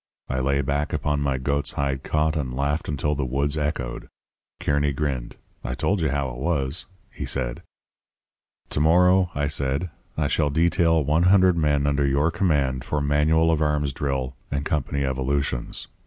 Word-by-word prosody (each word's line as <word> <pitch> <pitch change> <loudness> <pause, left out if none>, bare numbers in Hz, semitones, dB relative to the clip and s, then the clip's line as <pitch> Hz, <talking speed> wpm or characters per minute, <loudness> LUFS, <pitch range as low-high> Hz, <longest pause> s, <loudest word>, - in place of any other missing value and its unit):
I 65 - -1
lay 70 +2 +1
back 70 +3 -1
upon 75 -1 0
my 70 -2 0
goat's 70 +2 -1
hide 70 -1 -1
cot 75 +1 0
and 65 -5 -2
laughed 70 +4 -1
until 75 0 0
the 70 -1 -1
woods 70 +3 0
echoed. 75 -5 -3 0.5
Kearny 70 0 +1
grinned. 65 -4 -3 0.3
'I 65 - -3
told 95 +6 0
you 80 - +1
how 70 -1 -1
it - - -8
was,' 70 -1 -1 0.2
he - - -7
said. - - -2 1.1
"'To - - 0
morrow,' 90 +4 +4
I 75 0 0
said, 70 +4 -2 0.3
'I 75 -2 +1
shall 75 -1 +1
detail 80 +1 +3
one 75 +5 +2
hundred 95 -2 +5
men 75 -3 +1
under 70 -1 +2
your 70 +4 +2
command 75 -8 +1
for 75 - -1
manual 75 +3 +3
of 80 -1 +1
arms 75 -2 +1
drill 65 -3 -2
and 70 0 -2
company 70 -2 -1
evolutions. 65 -1 -1
70 Hz, 170 wpm, -24 LUFS, 70-80 Hz, 1.1 s, hundred